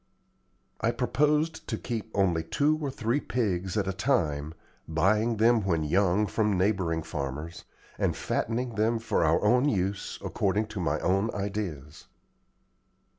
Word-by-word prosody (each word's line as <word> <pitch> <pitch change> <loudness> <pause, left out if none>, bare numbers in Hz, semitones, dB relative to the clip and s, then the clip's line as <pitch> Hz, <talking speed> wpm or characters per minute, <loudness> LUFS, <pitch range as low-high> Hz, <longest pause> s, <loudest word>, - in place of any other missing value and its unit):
I - - +1
proposed 150 +5 +1
to - - -2
keep 110 -2 -4
only 90 -5 +2
two 145 - +1
or 145 - -1
three 120 +1 -1
pigs 95 -8 -1
at 100 -2 0
a 95 - -1
time, 80 - 0 0.3
buying 105 +8 +2
them 115 0 +4
when 85 -5 +1
young 95 +5 +2
from 105 -1 0
neighboring 90 -4 +1
farmers, 75 +2 -5 0.3
and - - 0
fattening 120 +2 -2
them 110 +2 +1
for 110 -6 0
our 80 0 +2
own 125 +6 +4
use 100 -3 -2
according 105 +3 0
to 105 - -5
my 80 -4 0
own 95 +4 +1
ideas. 95 -8 -5
100 Hz, 140 wpm, -28 LUFS, 85-115 Hz, 0.3 s, them